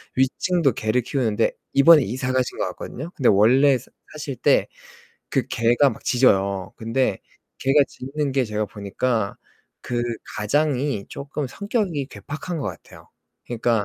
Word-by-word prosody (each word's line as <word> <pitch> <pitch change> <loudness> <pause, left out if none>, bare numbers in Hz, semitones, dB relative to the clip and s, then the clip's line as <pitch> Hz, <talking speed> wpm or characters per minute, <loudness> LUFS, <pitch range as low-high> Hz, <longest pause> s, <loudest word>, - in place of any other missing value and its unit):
위층도 135 +3 +2
개를 110 +3 0
키우는데 115 -3 0 0.2
이번에 150 +3 +7
이사 125 +4 -2
가신 130 -1 0
것 - - 0
같거든요. 155 +7 -7
근데 130 - +3
원래 130 +7 +5
사 120 - -16 0.2
사실 150 -3 -5
때 - - +3 0.6
그 - - +1
개가 120 +5 +3
막 - - -10
짖어요. 100 -6 +2
근데 115 +4 0 0.4
개가 135 +2 +3
짖는 140 +2 -4
게 130 -1 +2
제가 105 -1 -2
보니까 105 +2 -2 0.5
그 120 -1 -2 0.4
가장이 135 0 0
쪼끔 140 +1 -5
성격이 200 - -2
괴팍한 155 +5 -6
것 140 - -3
같아요. - - -12 0.4
그니까 115 -2 0
130 Hz, 290 characters per minute, -23 LUFS, 115-145 Hz, 0.6 s, 이번에